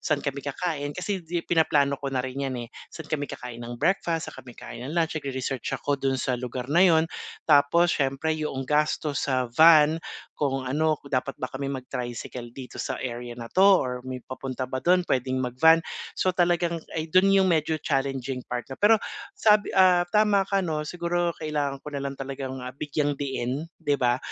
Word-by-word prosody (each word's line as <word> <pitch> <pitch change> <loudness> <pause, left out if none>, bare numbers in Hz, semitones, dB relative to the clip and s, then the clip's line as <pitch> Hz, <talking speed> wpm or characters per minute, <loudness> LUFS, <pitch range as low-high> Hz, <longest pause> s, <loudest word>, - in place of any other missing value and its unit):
saan 155 -2 -1
kami 140 0 -2
kakain, 145 0 -3
kasi 190 +1 -2
'di 170 +1 -4
pinaplano 145 -4 +2
ko 140 - -3
na 130 -1 -1
rin 135 +1 -3
'yan 130 - -4
eh. 115 - -12 0.2
Saan 160 -1 -10
kami 145 -2 -1
kakain 120 -1 -8
ng 120 0 -6
breakfast, 165 +2 0
saan - - -10
kami 120 -2 -14
kain - - -9
ng 160 - -5
lunch, 165 -1 +2
nag-re-research 135 -3 -3
ako 140 -1 -2
dun 135 -1 +1
sa 130 - -1
lugar 125 0 -4
na 175 - +5
'yon, 165 -4 +6 0.4
tapos 155 +3 +4
siyempre 135 +3 0
yong 135 -3 -3
gastos 150 +1 0
sa 130 -3 0
van, 160 +2 +6 0.3
kung 135 -2 -1
ano, 155 +4 +1
kung 140 - -16
dapat 130 +1 -1
ba 130 - -3
kami 135 +1 -3
mag-tricycle 125 -2 -5
dito 130 -2 -7
sa - - -3
area 120 -1 -5
na 115 -1 -8
'to, 190 - +4
or 135 -10 +4
may 130 0 -6
papunta 130 0 -5
ba 130 +1 -4
do'n, 180 0 +3
puwedeng 130 -2 0
mag-van. 160 +7 +5 0.4
So 185 - +1
talagang 175 -1 +1 0.2
ay 155 - -2
dun, 185 +4 +4
'yong 195 -1 +5
medyo 160 -1 +1
challenging 135 -4 -2
part 125 0 -2
na, 135 - -7
pero 210 +2 +6 0.4
sabi, 210 -1 +4
ah, 185 -2 +6
tama 210 -2 +4
ka 195 - +3
'no, 160 -5 -1
siguro 175 +1 -1
kailangan 145 -3 -2
ko 140 - -10
na 140 - -3
lang 140 0 -3
talagang 135 -1 -5
ah, 125 +1 -7
bigyang-diin, 145 -1 -2
'di 145 -3 0
ba? 125 0 +2
145 Hz, 190 wpm, -26 LUFS, 130-165 Hz, 0.4 s, yon